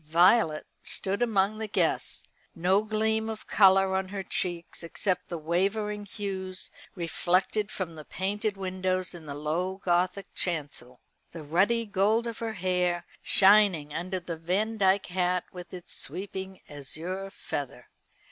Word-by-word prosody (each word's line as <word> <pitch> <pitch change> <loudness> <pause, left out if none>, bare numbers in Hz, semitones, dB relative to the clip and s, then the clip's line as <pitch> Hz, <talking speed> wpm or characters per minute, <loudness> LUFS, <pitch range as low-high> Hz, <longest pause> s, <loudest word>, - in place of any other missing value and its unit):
Violet 170 0 +4 0.2
stood 195 +3 -1
among 215 -2 +2
the 220 - -2
guests, 210 - 0 0.3
no 185 +4 +3
gleam 220 +1 0
of 220 -1 -6
colour 195 -1 +5
on 190 0 0
her 195 0 -4
cheeks 175 -2 -2
except 180 +2 -1
the 170 - -3
wavering 200 +6 -1
hues 190 -2 -4 0.2
reflected 185 +4 +1
from 180 -5 -4
the 155 -1 -9
painted 200 +5 -2
windows 185 -1 -1
in 165 -3 -10
the 140 - -5
low 165 +6 -1
Gothic 185 +1 0
chancel 145 -7 -3 0.3
the 165 -2 -7
ruddy 195 +10 +2
gold 210 +3 +2
of 230 -2 -5
her 225 -1 -3
hair 180 -2 0 0.2
shining 190 -7 +5
under 185 +4 -2
the 170 -2 -5
Vandyke 195 +3 +2
hat 180 0 0
with 180 -1 -9
its 180 -2 -9
sweeping 190 0 -5
azure 165 +7 -5
feather. 145 -7 -5
185 Hz, 140 wpm, -28 LUFS, 175-205 Hz, 0.3 s, colour